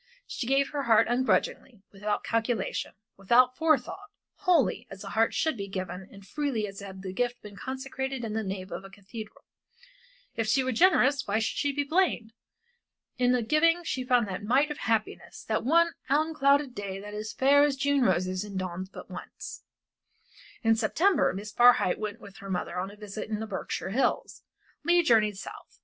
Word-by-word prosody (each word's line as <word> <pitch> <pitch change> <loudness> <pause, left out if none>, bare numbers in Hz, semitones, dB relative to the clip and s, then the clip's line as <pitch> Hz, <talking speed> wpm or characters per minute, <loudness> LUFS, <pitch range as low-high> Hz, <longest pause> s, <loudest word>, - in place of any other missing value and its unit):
She 235 - -5
gave 275 +1 +2
her 290 - -2
heart 230 -5 +4
ungrudgingly, 245 -2 0
without 205 +1 -2
calculation, 230 0 -1 0.2
without 245 +6 +4
forethought, 325 +6 0 0.3
wholly, 315 - +2
as 195 +1 -9
a 195 - -7
heart 225 +2 +1
should 315 -3 +1
be 200 -3 -5
given 185 0 -6
and 195 -1 -14
freely 280 -5 -2
as 195 -1 -8
had 190 -1 -9
the 185 -1 -5
gift 245 +3 -2
been 210 -1 -10
consecrated 265 0 -4
in 215 - -4
the 220 - -1
nave 190 -2 -5
of - - -5
a 195 - -10
cathedral. 205 +3 -10 0.9
If 225 -1 -1
she 260 +4 +3
were 260 - -1
generous 280 -2 +3
why 200 +2 +1
should 225 - -1
she 285 - +1
be 285 +1 -1
blamed? 285 -8 0 0.9
In 250 0 +3
the 250 -2 +2
giving 330 +7 +3
she 260 -6 -2
found 245 -3 +2
that 190 0 -5
mite 270 +7 +2
of 295 - -5
happiness, 225 -2 -2
that 220 - -1
one 335 +5 +3 0.2
unclouded 285 -2 +2
day 200 -4 -5
that 205 +1 -9
is 215 +1 -5
fair 280 +2 +4
as 290 -2 +2
June 280 0 +1
roses 185 -3 +1
and 200 -2 -7
dawns 185 0 -4
but - - -10
once. - - -8 1.0
In 225 0 +4
September 290 - +2
Miss 205 +3 -6
Barhyte 240 -5 +5
went 210 -1 -4
with 200 +1 -13
her 200 -3 -9
mother 180 -1 -2
on 190 +2 -3
a 205 - -12
visit 210 +1 -7
in 215 -1 -2
the 220 - -3
Berkshire 195 -2 -4
Hills. 260 +6 0 0.4
Leigh 345 +2 +4
journeyed 215 -7 +3
South. - - -10
225 Hz, 185 wpm, -28 LUFS, 200-275 Hz, 1.0 s, Barhyte